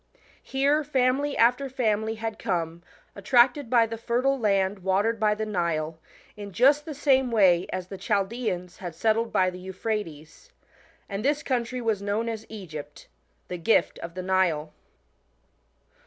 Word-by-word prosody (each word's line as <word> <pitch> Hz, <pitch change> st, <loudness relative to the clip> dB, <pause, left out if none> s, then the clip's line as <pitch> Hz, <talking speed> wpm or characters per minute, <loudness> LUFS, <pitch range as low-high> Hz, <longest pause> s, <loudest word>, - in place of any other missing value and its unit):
Here 280 Hz, +3 st, +1 dB
family 275 Hz, 0 st, +1 dB
after 250 Hz, +4 st, +3 dB
family 220 Hz, -3 st, 0 dB
had 225 Hz, 0 st, -5 dB
come, 170 Hz, -3 st, -2 dB, 0.3 s
attracted 245 Hz, +5 st, +3 dB
by 235 Hz, -2 st, +5 dB
the 225 Hz, 0 st, -6 dB
fertile 255 Hz, +4 st, 0 dB
land 195 Hz, -2 st, +1 dB
watered 200 Hz, +5 st, +1 dB
by 210 Hz, -1 st, +2 dB
the 220 Hz, +1 st, -3 dB
Nile, 165 Hz, -5 st, -2 dB, 0.4 s
in 205 Hz, -1 st, -8 dB
just 280 Hz, +9 st, +4 dB
the 310 Hz, -, -6 dB
same 265 Hz, -2 st, +3 dB
way 185 Hz, -6 st, +4 dB
as 185 Hz, -1 st, -4 dB
tbe 195 Hz, -, -8 dB
Chaldeans 200 Hz, -3 st, -2 dB
had 175 Hz, -3 st, -7 dB
settled 225 Hz, +5 st, +1 dB
by 185 Hz, 0 st, +2 dB
the 180 Hz, -, -9 dB
Euphrates. 190 Hz, -, -5 dB, 0.6 s
And 200 Hz, +1 st, -4 dB
this 295 Hz, +2 st, +1 dB
country 250 Hz, -1 st, -2 dB
was 220 Hz, -4 st, 0 dB
known 210 Hz, +3 st, -1 dB
as 220 Hz, -1 st, -6 dB
Egypt 155 Hz, -9 st, -9 dB, 0.4 s
the 180 Hz, -, -5 dB
gift 220 Hz, +7 st, +2 dB
of 170 Hz, 0 st, -8 dB
the 185 Hz, -, -4 dB
Nile. 175 Hz, -5 st, +1 dB
215 Hz, 150 wpm, -26 LUFS, 185-245 Hz, 0.6 s, by